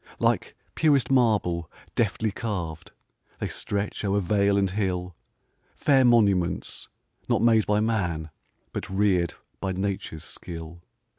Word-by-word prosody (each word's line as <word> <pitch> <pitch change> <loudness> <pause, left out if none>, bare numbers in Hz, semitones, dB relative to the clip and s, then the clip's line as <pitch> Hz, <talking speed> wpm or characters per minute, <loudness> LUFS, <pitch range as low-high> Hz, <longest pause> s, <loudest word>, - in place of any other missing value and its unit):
Like - - +1 0.2
purest 145 -5 +3
marble, 105 -10 +2 0.2
deftly 110 -1 0
carv'd, 90 -8 -4 0.5
They - - -2
stretch 100 +1 -3
o'er 100 0 +2
vale 100 +1 +2
and 100 -1 +3
hill, 90 -3 -2 0.6
Fair 135 -3 +4
monuments, 100 -8 +2 0.4
not - - +2
made 115 -2 +4
by 105 0 +2
man, 90 -8 -1 0.4
But - - -4
rear'd 95 -3 +2 0.2
by 95 -1 -2
nature's 95 -4 -3
skill. 85 0 -8
100 Hz, 120 wpm, -26 LUFS, 90-110 Hz, 0.6 s, Fair